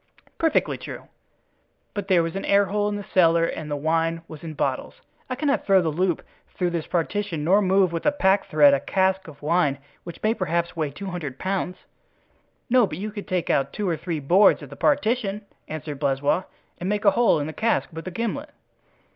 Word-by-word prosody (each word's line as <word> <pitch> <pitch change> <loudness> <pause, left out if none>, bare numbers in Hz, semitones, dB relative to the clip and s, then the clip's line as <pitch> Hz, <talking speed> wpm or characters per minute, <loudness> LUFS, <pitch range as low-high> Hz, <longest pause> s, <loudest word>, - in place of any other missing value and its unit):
"Perfectly 325 -2 +1
true; - - -9 0.8
but 205 -2 -4
there 180 -4 +4
was 165 +1 -4
an 195 - -2
airhole 200 +1 +2
in 205 - -3
the 205 - -5
cellar 165 -2 +5
and 155 -2 -5
the 145 - -1
wine 165 +2 0
was 155 -1 -11
in 160 -2 -6
bottles. - - -2 0.3
I 255 - -2
cannot 280 +1 0
throw 195 -1 +6
the 170 -3 0
loop 175 +1 0 0.3
through 180 -1 0
this 170 -2 -3
partition 175 -1 -2
nor 190 +6 +4
move 190 -2 +3
with 165 - -2
a - - +5
pack 195 -9 +2
thread 145 -2 +6
a 140 - +3
cask 190 +1 0
of 150 -2 -13
wine 150 -3 +2 0.3
which 170 - -10
may 215 +1 +3
perhaps 170 -4 -1
weigh 155 -3 -1
two 190 +8 -7
hundred 150 -7 -5
pounds." 185 0 -2 0.9
"No, 245 -3 +4
but - - -6
you 210 +3 -4
can 205 -1 -7
take 180 -2 -1
out 135 0 +1
two 210 -2 -2
or 170 - +1
three 165 0 -4
boards 180 +9 +4
of - - -11
the - - -8
partition," 230 -8 0 0.2
answered 150 -2 -6
Blaisois, 140 +5 +1 0.3
"and 180 - -3
make 210 +1 -1
a 200 - +7
hole 235 -8 +3
in 145 - -2
the 155 - -5
cask 230 +5 +1
with 165 +3 -7
a - - -4
gimlet." 235 - -3
180 Hz, 205 wpm, -24 LUFS, 160-205 Hz, 0.9 s, a